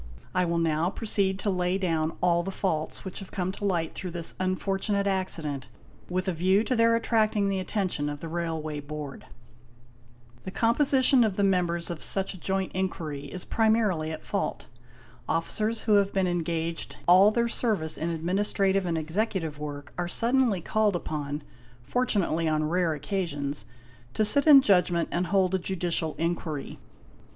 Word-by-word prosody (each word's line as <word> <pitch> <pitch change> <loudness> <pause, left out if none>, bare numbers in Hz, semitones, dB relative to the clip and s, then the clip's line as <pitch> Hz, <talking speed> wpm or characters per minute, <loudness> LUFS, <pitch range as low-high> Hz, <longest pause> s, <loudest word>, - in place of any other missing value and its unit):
I 185 -1 +2
will 170 0 0
now 165 +1 +1
proceed 195 -2 0
to 205 - 0
lay 180 0 0
down 165 -4 -1
all 175 -1 +3
the 180 - -4
faults, 160 -5 -2
which 190 - -6
have 195 - -9
come 185 -1 -2
to 205 - -6
light 170 -5 0
through 185 - -5
this 170 -1 -3
unfortunate 195 +2 0
accident, 165 -8 -1 0.4
with 185 +1 -1
a 185 - +1
view 190 +5 +3
to 255 - 0
their 230 0 +4
attracting 215 -3 +2
the 195 -1 0
attention 185 -6 -2
of 145 0 -5
the 165 - -6
Railway 160 -2 -3
Board. 145 -1 -7 1.2
''The 185 - -6
composition 260 +1 +4
of 215 -4 0
the 200 - +1
members 175 -3 +1
of 170 - -6
such 195 0 -2
a 185 - -11
joint 190 +1 -1
inquiry 160 -6 -3
is 180 +5 -7
primarily 215 -8 +2
at 160 - -7
fault. - - -2 0.6
Officers, 215 +7 0
who 215 - +2
have 200 0 +2
been 190 -1 +1
engaged 170 -1 -2
all 185 +4 +8
their 235 +2 +1
service 210 -9 -1
in 165 - -2
administrative 190 +3 0
and 165 -1 0
executive 160 -1 -2
work, 145 -1 -7
are 175 - 0
suddenly 235 -1 +2
called 210 +2 +1
upon, 150 -3 -4 0.4
fortunately 180 - 0
on 155 0 +1
rare 170 +1 +1
occasions, 145 - -3 0.5
to 215 - +2
sit 280 +8 +2
in 280 -3 +9
judgment 180 -4 +3
and 175 +1 0
hold 190 -2 +2
a 190 - +2
judicial 175 -3 -2
inquiry. 165 -3 -3
180 Hz, 165 wpm, -27 LUFS, 160-200 Hz, 1.2 s, in